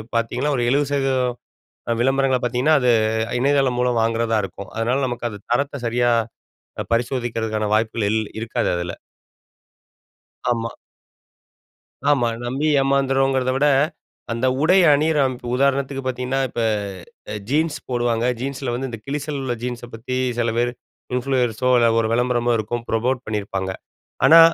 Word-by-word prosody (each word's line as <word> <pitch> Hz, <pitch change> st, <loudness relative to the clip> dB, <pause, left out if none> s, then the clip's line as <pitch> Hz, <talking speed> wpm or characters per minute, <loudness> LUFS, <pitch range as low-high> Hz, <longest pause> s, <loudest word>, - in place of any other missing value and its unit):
பாத்தீங்கன்னா, 125 Hz, +5 st, 0 dB
ஒரு 120 Hz, -, 0 dB
70% 135 Hz, -2 st, +1 dB, 0.6 s
அ -, -, -2 dB
விளம்பரங்கள 135 Hz, 0 st, +2 dB
பாத்தீங்கன்னா, 125 Hz, +6 st, +2 dB
அது 125 Hz, -, +4 dB, 0.5 s
இணையதளம் 135 Hz, -1 st, +2 dB
மூலம் 125 Hz, -2 st, +2 dB
வாங்குறதா 115 Hz, 0 st, +1 dB
இருக்கும். 100 Hz, 0 st, -10 dB
அதனால 120 Hz, +5 st, 0 dB
நமக்கு 120 Hz, -1 st, -3 dB
அது 105 Hz, -, -8 dB
தரத்தை 140 Hz, +2 st, -1 dB
சரியா 120 Hz, +1 st, +2 dB, 0.7 s
அ -, -, -2 dB
பரிசோதிக்கிறதுக்கான 115 Hz, -3 st, -1 dB
வாய்ப்புகள் 110 Hz, -1 st, 0 dB
இல் 110 Hz, 0 st, +1 dB, 0.2 s
இருக்காது 115 Hz, 0 st, -1 dB
அதுல. 85 Hz, 0 st, -3 dB, 1.6 s
ஆமா. 115 Hz, -1 st, 0 dB, 1.4 s
ஆமா. 130 Hz, -5 st, +3 dB, 0.2 s
நம்பி 135 Hz, +5 st, -1 dB
ஏமாந்துறோங்கிறத 135 Hz, -1 st, +2 dB
விட, 145 Hz, -, +3 dB, 0.7 s
அந்த 115 Hz, +3 st, 0 dB, 0.2 s
உடை 180 Hz, +4 st, +5 dB
அணியிற 150 Hz, +1 st, +2 dB
அமை 130 Hz, -1 st, -3 dB, 0.2 s
உதாரணத்துக்கு 140 Hz, 0 st, +1 dB
பாத்தீங்கன்னா, 130 Hz, +1 st, -1 dB
இப்ப 120 Hz, -1 st, -3 dB, 0.7 s
அ -, -, -4 dB
ஜீன்ஸ் 155 Hz, +2 st, +1 dB
போடுவாங்க. 120 Hz, -1 st, +1 dB
ஜீன்ஸ்ல 135 Hz, -1 st, -3 dB
வந்து 130 Hz, +2 st, -3 dB
இந்த 115 Hz, -, -6 dB
கிழிசல் 145 Hz, +1 st, -3 dB
உள்ள 130 Hz, -2 st, -1 dB
ஜீன்ஸ 120 Hz, -1 st, -4 dB
பத்தி 125 Hz, +3 st, -4 dB, 0.2 s
சில 120 Hz, -1 st, +1 dB
பேரு 120 Hz, 0 st, +1 dB, 0.4 s
இன்ஃப்ளூயர்ஸோ 125 Hz, -2 st, 0 dB
இல்ல 120 Hz, -1 st, +4 dB
ஒரு 115 Hz, -, +2 dB
வெளம்பரமோ 120 Hz, 0 st, +2 dB
இருக்கும், 115 Hz, +2 st, -3 dB
ப்ரமோட் 120 Hz, +3 st, 0 dB
பண்ணீருப்பாங்க. 100 Hz, -3 st, -3 dB, 0.5 s
ஆனா 165 Hz, +1 st, +9 dB
125 Hz, 130 wpm, -21 LUFS, 115-135 Hz, 1.6 s, ஆனா